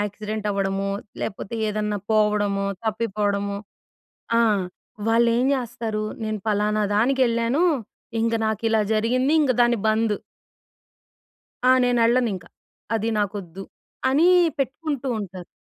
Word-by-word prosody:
Accident 210 +1 -4
అవ్వడము, 195 0 -1 0.3
లేపోతే 200 +1 -4
ఏదన్నా 210 0 -1
పోవడము, 210 -2 +2 0.2
తప్పిపోవడము 205 -2 -1 0.8
ఆ! - - +5 0.7
వాళ్ళెం 235 +2 +3
జెస్తారు, 235 -4 -2 0.2
నేను 215 -1 -2
ఫలానా 210 0 +1
దానికెళ్ళాను. 240 +3 +2 0.6
ఇంక 230 0 +1
నాకిలా 220 +1 +1
జరిగింది. 250 +6 +2
ఇంగ 280 -4 +3
దాని 240 0 +3
బందు. 220 -1 +2 1.5
ఆ! - - +8
నేనెళ్ళనింకా. 235 -6 +2 0.5
అది 225 +1 0
నాకొద్దు. 195 -3 -3 0.5
అని 300 +6 +4 0.3
పెట్టుకుంటూ 275 0 -2
ఉంటారు. 185 -3 -8
220 Hz, 95 wpm, -23 LUFS, 205-235 Hz, 1.5 s, ఆ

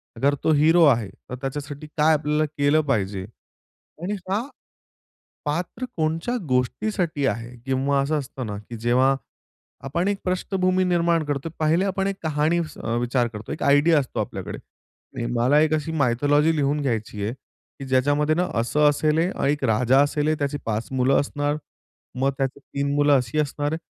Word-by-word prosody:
अगर 140 +5 +2
तो 160 - +3
हिरो 160 +3 +5
आहे, 115 -8 +3
तर 125 - -10
त्याच्यासाठी 145 +2 -5
काय 155 +1 +5
आपल्याला 150 0 +1
केलं 145 +1 +2
पाहिजे 100 -4 -1 0.8
आणि 205 +3 -1
का? 200 +3 +1 1.0
पात्र 170 +11 -3
कोणच्या 165 +10 -1
गोष्टीसाठी 150 - 0
आहे 115 +2 -3
किंवा 135 +1 +1
असं 150 +2 0
असतं 130 -3 -6
ना, 105 -1 -4
की 115 +3 -9
जेव्हा 125 +4 +3 0.7
आपण 170 +7 -1
एक 200 -1 0
पृष्ठभूमी 185 0 +1
निर्माण 170 -2 +2
करतो, 145 +2 -3
पहिले 160 +5 +2
आपण 195 0 -1
एक 195 - -2
कहाणी 155 +2 +1
अ, 150 -8 -4
विचार 120 0 +1
करतो, 110 -1 -8
एक - - -4
आयडिया 145 +3 +5
असतो 130 - -4
आपल्याकडे, - - -4 0.8
मला 130 +6 +4
एक 155 0 +2
अशी 155 +1 -1
मायथॉलॉजी 145 +3 +2
लिहून 145 0 +1
घ्यायची 110 -5 -2
आहे, 110 +4 -2 0.5
की 135 - -6
ज्याच्यामध्ये 145 +4 +2
ना 180 +1 +1
असं 150 +5 +3
असेल 155 +4 +1
आणि 140 - 0
1 145 - -6
राजा 125 +4 +3
असेल 150 +1 +1
त्याची 145 0 -2
5 110 0 -2
मुलं 130 +1 +3
असणार, 145 +1 -2 0.6
मग 135 +1 +2
त्यात 135 -1 +1
3 140 0 -3
मुलं 145 0 +4
अशी 125 +4 -1
असणार. 145 +1 -1
145 Hz, 160 wpm, -24 LUFS, 130-160 Hz, 1.0 s, हिरो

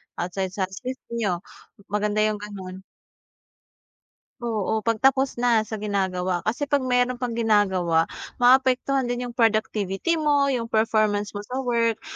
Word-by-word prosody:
Outside 185 +2 -3
sa 195 - 0
space 255 +7 -6
n'yo, 205 -7 -1 0.5
maganda 210 0 0
'yong 215 -1 0
gano'n. 190 -2 -8 1.6
Oo, 220 -2 -1
pagtapos 265 +4 +2
na 240 -2 +3
sa 220 0 -5
ginagawa. 190 -3 -1
Kasi 245 +7 -1
'pag 285 -1 +1
meron 250 -1 +1
pang 235 -2 -2
ginagawa, 190 -7 +2 0.3
maapektuhan 260 +1 +4
din 245 0 -3
'yong 240 - -11
productivity 220 - +1
mo, 290 -3 +2
'yong 245 -3 -1
performance 215 -2 +1
mo - - -4
sa 255 +3 -3
work. 230 -3 0
220 Hz, 135 wpm, -24 LUFS, 205-250 Hz, 1.6 s, maapektuhan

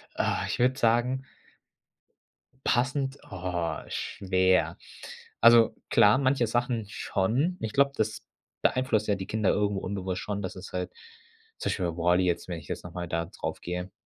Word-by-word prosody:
Ah, - - 0
ich - - -3
würde 130 +2 +3
sagen 120 +2 +2 1.4
passend? 135 +2 +1
Oh, 90 -3 -3
schwer. 95 -1 +1 0.6
Also, 115 -1 +7
klar, 105 +4 +6
manche 130 -3 +2
Sachen 120 -1 0
schon. 120 - 0
Ich 110 - -3
glaube, 140 0 +4
das 110 0 -1 0.4
beeinflusst 125 -5 +1
ja 105 - +2
die 95 0 -6
Kinder 110 -3 +1
irgendwo 100 -2 +1
unbewusst 95 -1 -3
schon, 100 -1 -3
dass 95 - -5
es 95 0 -9
halt 90 0 -3 0.7
zum - - -2
Beispiel 90 -3 0
bei 85 - -11
WALL-E 90 +2 +3
jetzt, 90 0 0
wenn 85 -2 -4
ich 75 - -15
jetzt - - -5
noch 85 - -9
mal 90 -1 -4
da 85 0 -1
drauf 80 -2 -5
gehe, 90 +1 -4
105 Hz, 160 wpm, -28 LUFS, 90-120 Hz, 1.4 s, Also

